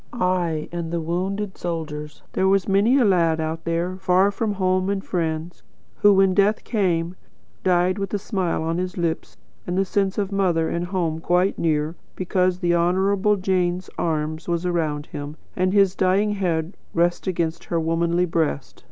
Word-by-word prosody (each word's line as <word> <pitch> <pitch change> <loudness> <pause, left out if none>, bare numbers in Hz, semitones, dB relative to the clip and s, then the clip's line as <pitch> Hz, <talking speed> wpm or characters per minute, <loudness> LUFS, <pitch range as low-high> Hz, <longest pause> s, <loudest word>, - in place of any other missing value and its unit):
Ay, 180 -7 0
and 170 -1 -4
the 170 - -1
wounded 190 +5 -3
soldiers! 150 -3 -5
There 190 - +2
was 195 0 +2
many 205 +7 +4
a 255 - +4
lad 170 -5 +3
out 160 +1 -3
there, 170 +2 -1
far 190 +1 +3
from 210 +1 -1
home 185 -1 +1
and 200 -1 -2
friends, 165 -1 -3 0.4
who, 205 - +6
when 195 -1 +4
death 205 +2 +2
came, 180 -5 0 0.5
died 185 +1 +2
with 195 -2 -3
a - - +2
smile 185 -5 -2
on 165 +2 -1
his 185 0 -4
lips, 170 -2 -2 0.3
and 180 +1 -1
a 195 - +2
sense 195 0 0
of 205 -1 -1
mother 180 -5 +1
and 170 +1 -2
home 175 -4 -1
quite 180 +3 +1
near, 155 -1 0 0.2
because 185 -1 +1
the 175 -1 +1
Honourable 190 +4 +2
Jane's 185 -2 -1
arm 155 -1 -1
was 170 0 -1
around 155 -4 -1
him, 145 +2 -7 0.2
and 185 0 +1
his 195 -2 +4
dying 195 +3 +2
head 175 -3 -1 0.2
rested 175 +3 +1
against 165 -2 -2
her 170 - -1
womanly 170 +2 +1
breast. 160 -5 -2
180 Hz, 170 wpm, -23 LUFS, 165-190 Hz, 0.5 s, who